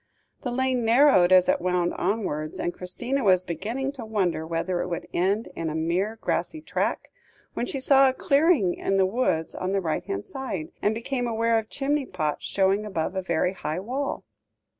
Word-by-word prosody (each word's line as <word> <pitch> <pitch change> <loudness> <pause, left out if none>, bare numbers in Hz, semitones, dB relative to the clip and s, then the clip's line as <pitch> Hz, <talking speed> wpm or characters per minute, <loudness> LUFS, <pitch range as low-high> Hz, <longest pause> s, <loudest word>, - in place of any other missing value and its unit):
The 250 - -3
lane 255 0 0
narrowed 225 -6 +5
as 185 -1 +6
it - - +2
wound 180 -1 +1
onwards, 175 -6 -2
and 175 - -1
Christina 240 +9 -3
was 185 -3 +4
beginning 225 - -3
to 270 -4 -8
wonder 185 -7 -1
whether 170 +2 -1
it - - -3
would 170 - -4
end 195 +5 0
in 165 -1 -2
a 155 - -4
mere 175 +7 0
grassy 315 - -2
track, 310 - -2 0.4
when 245 - -2
she 270 - -3
saw 270 0 +5
a - - -1
clearing 280 - +3
in 195 - -1
the 190 - +4
woods 185 -6 0
on 185 +1 -3
the 200 - +2
right 160 -4 -2
hand 100 +1 -4
side, 200 - -5
and 210 +1 +1
became 245 +2 -2
aware 230 0 +2
of 220 - -8
chimney 280 0 -1
pots 155 -5 -2
showing 195 +1 +2
above 190 -3 -3
a 190 - 0
very 180 0 0
high 170 -3 -3
wall. 260 +8 -3
195 Hz, 190 wpm, -25 LUFS, 175-250 Hz, 0.4 s, as